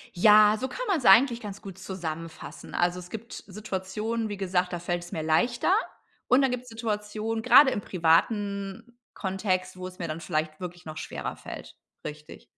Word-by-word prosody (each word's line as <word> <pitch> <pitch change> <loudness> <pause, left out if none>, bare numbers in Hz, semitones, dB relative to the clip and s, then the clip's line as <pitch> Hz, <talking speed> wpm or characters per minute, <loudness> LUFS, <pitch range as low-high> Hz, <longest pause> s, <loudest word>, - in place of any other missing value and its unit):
Ja, 210 +3 +7
so 260 - -2
kann - - -5
man's 325 -10 +1
eigentlich 235 +5 +7
ganz 205 -3 -8
gut 195 -2 -9
zusammenfassen. 165 -5 -7
Also, 175 +1 +1
es 180 0 -11
gibt 225 +4 -8 0.2
Situationen, 210 +3 -3
wie 205 - -4
gesagt, 180 -1 0
da 175 - -2
fällt 175 0 -2
es 175 - -11
mir 160 - -2
leichter. 240 - +2 0.6
Und 255 +2 +5
dann 270 -2 +2
gibt's 250 0 -4
Situationen, 220 0 -3
grade 255 +4 +7
im - - -1
privaten 200 +5 0 0.2
Kontext, 185 -1 -2
wo 185 0 -5
es 185 0 -12
mir 170 - -3
dann 155 +1 -4
vielleicht 155 -2 -2
wirklich 180 -1 -7
noch 155 0 -7
schwerer - - -5
fällt. - - -9 0.3
Richtig. 150 0 -9
195 Hz, 175 wpm, -27 LUFS, 175-225 Hz, 0.6 s, Ja